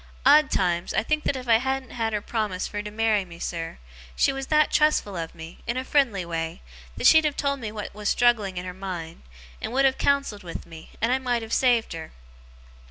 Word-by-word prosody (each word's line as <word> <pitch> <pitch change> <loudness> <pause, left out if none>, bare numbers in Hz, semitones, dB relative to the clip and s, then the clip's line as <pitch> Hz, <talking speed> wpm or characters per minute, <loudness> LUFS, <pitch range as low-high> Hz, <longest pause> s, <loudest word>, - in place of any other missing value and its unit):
Odd 295 +1 +7
times, 175 -2 0
I - - +2
think 305 +5 -1
that - - +1
if 255 -1 -6
I 230 -1 +6
hadn't 265 +1 -2
had 225 -2 -2
her 210 -1 -1
promise 210 -5 -2
fur 205 - -4
to 210 - -6
marry 215 -1 +1
me, 170 -2 -12
sir, 165 -1 -4 0.4
she 270 - +3
was 270 0 -5
that 305 -1 +3
trustful 300 -10 +2
of 165 -1 -5
me, 165 +1 -10
in 235 - -1
a 260 - -2
friendly 240 -11 +2
way, 165 - -4 0.3
that - - -3
she'd 315 0 +8
have 300 -2 -1
told 280 -1 0
me 220 -4 -5
what 210 -1 -6
was 210 0 -2
struggling 220 -6 +2
in 180 - -4
her 180 - -5
mind, 180 -3 -6 0.4
and - - -4
would 270 +1 +3
have 265 -1 +2
counselled 280 -7 +1
with 170 -2 -7
me, 165 -1 -12
and 230 +2 +2
I 260 - +2
might 245 -3 -1
have 225 - -6
saved 240 -6 +2
her. 160 -1 -8
220 Hz, 230 wpm, -25 LUFS, 180-265 Hz, 0.4 s, she'd